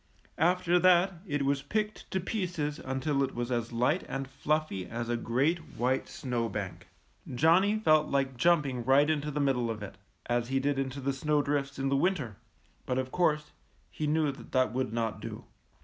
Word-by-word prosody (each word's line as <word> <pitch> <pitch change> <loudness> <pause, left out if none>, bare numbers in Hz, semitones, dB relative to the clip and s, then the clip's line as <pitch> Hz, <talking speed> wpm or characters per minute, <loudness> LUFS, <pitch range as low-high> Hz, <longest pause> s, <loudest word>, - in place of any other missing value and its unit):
After 180 +2 +3
that 185 +1 +5
it 145 -3 -1
was 140 0 +1
picked 210 +8 -3
to 190 - -1
pieces 175 -7 -2
until 135 +2 -1
it 135 -1 -1
was 120 +1 -3
as 120 -1 -1
light 125 +9 +1
and 135 0 -3
fiuffy 140 -7 -2
as 120 0 -4
a 120 - +1
great 130 +9 +1 0.2
white 130 +2 0
snow 120 -3 -2
bank. 100 -3 -5 0.5
Johnny 180 - +4
felt 155 -7 +4
like 135 -1 0
jumping 140 -4 +2
right 135 +4 +5
into 150 -1 0
the 150 0 -3
middle 130 -4 +1
of 110 -2 -4
it, 95 -1 -9 0.3
as 120 0 0
he 135 +1 +1
did 140 0 0
into 135 0 -3
the 135 +1 0
snowdrifts 145 -1 0
in 135 0 -1
the 140 - +2
winter; 140 - 0 0.5
but, 125 - 0
of 130 0 -2
course, 150 -4 +1 0.4
he 155 - -3
knew 155 -1 +2
that 135 - -13
that 130 -4 +2
would 130 -2 -1
not 115 -1 -2
do. - - -7
140 Hz, 185 wpm, -30 LUFS, 125-155 Hz, 0.5 s, that